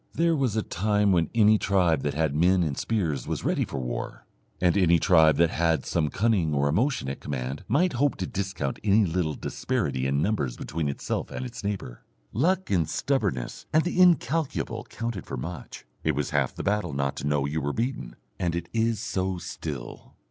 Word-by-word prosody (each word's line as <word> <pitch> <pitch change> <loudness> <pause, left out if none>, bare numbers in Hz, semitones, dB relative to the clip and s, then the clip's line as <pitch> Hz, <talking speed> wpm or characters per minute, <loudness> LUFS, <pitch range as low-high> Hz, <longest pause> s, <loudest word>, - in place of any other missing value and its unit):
There 165 0 +2
was 130 -7 0
a 110 - +1
time 105 +2 +1
when 85 -3 +2
any 110 -1 +5
tribe 90 -7 +2
that 70 0 -2
had 80 -2 +1
men 90 +4 +3
and 75 -4 -1
spears 80 - -1
was - - -3
ready - - +1
for - - -5
war, - - -5 0.3
and 90 0 +3
any 85 -4 +5
tribe 80 -3 +5
that 85 -1 +4
had 80 -1 +1
some 80 -3 0
cunning 95 -5 +1
or 70 +1 +2
emotion 115 - +1
at 70 - -4
command 65 0 -4
might 175 +4 +2
hope 140 +3 +1
to 95 - -3
discount 95 -10 -3
any 105 +1 +4
little 80 -3 -1
disparity 65 +1 -2
in 70 +1 +1
numbers 75 - 0
between 75 -1 -3
itself 70 - -3
and 130 - -5
its 120 -3 -8
neighbour. 100 -12 -4 0.3
Luck 175 - +1
and 85 -5 +2
stubbornness 100 - -1
and 155 +1 +4
the 180 +1 +1
incalculable 165 -4 +2
counted 115 -6 -5
for - - -4
much; 80 +4 -7 0.2
it 80 -2 +1
was 75 0 -2
half - - 0
the - - -5
battle 100 -6 0
not 70 0 -1
to 70 - -3
know 75 -1 +1
you 75 +2 -2
were 70 +1 -1
beaten, 115 - -3 0.2
and 85 -2 0
it 85 0 -4
is 115 -1 +1
so 95 -4 -2
still. 75 -6 -7
90 Hz, 195 wpm, -26 LUFS, 75-110 Hz, 0.3 s, any